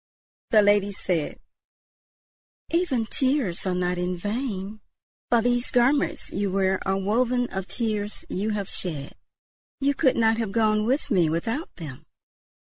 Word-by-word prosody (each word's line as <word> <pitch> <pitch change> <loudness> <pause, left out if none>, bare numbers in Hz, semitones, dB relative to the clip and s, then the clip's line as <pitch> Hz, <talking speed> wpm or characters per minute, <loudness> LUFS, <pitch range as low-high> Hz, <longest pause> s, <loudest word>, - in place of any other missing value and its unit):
The 215 -4 +6
lady 205 0 +3
said: 175 -5 -2 1.3
"Even 325 -9 +1
tears 255 - +1
are 185 - 0
not 180 0 -1
in 180 0 -1
vain, 210 0 -4 0.5
for 235 -2 +3
these 245 0 +1
garments 265 +4 +2
you 200 +1 -1
wear 190 0 +1
are 195 0 +1
woven 245 +5 +1
of 190 0 -4
the - - -3
tears 215 -3 -2
you 205 +4 -2
have 205 -3 -2
shed. 150 -9 -4 0.7
You 280 0 +2
could 265 -1 +2
not 225 0 +3
have 220 -4 -2
gone 215 -1 +2
with 270 +2 0
me 175 -6 +3
without 225 - -3
them." 150 -7 -9
210 Hz, 145 wpm, -25 LUFS, 190-245 Hz, 1.3 s, The